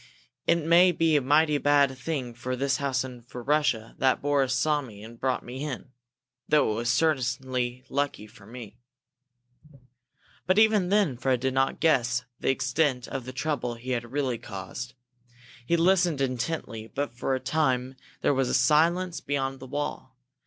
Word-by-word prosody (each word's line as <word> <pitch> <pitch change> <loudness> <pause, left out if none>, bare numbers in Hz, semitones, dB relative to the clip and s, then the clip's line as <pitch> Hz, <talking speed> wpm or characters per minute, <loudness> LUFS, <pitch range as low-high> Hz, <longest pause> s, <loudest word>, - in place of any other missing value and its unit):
It 170 -2 +2
may 175 +2 +6
be 165 -2 +2
a 145 - +4
mighty 150 +2 +3
bad 140 -2 +3
thing 130 -2 -4
for 125 +2 -4
this 135 +1 0
house 135 -2 0
and 125 -2 -9
for 125 0 -9
Russia 140 -6 +1
that 130 -1 +3
Boris 140 -2 +1
saw 150 +2 +1
me 105 -6 -11
and 115 +1 -12
brought 130 -1 -1
me 130 +3 -6
in, 130 -3 -6 0.6
though 150 -7 +3
it - - -2
was 115 +1 -2
certainly 130 -4 0
lucky 140 -6 -2
for 105 -2 -17
me!" 115 -1 -10 1.7
But 185 +2 +3
even 215 -4 +4
then 195 - +2
Fred 130 0 +1
did 130 +1 -1
not 135 0 +1
guess 125 -6 +2
the - - -1
extent 130 -1 0
of 135 -3 -5
the 130 - -6
trouble 130 -3 -2
he 125 +2 -7
had 120 -1 -3
really 130 -4 -1
caused. 100 +6 -7 0.7
He 170 - +3
listened 175 -3 +3
intently, 125 -3 -3
but 140 +2 -4
for 130 +2 -1
a - - -2
time 130 -2 0 0.3
there - - +3
was 135 -2 +1
silence 165 +6 +2
beyond 135 -1 -2
the 130 - -9
wall. 145 -2 -5
135 Hz, 165 wpm, -27 LUFS, 125-150 Hz, 1.7 s, may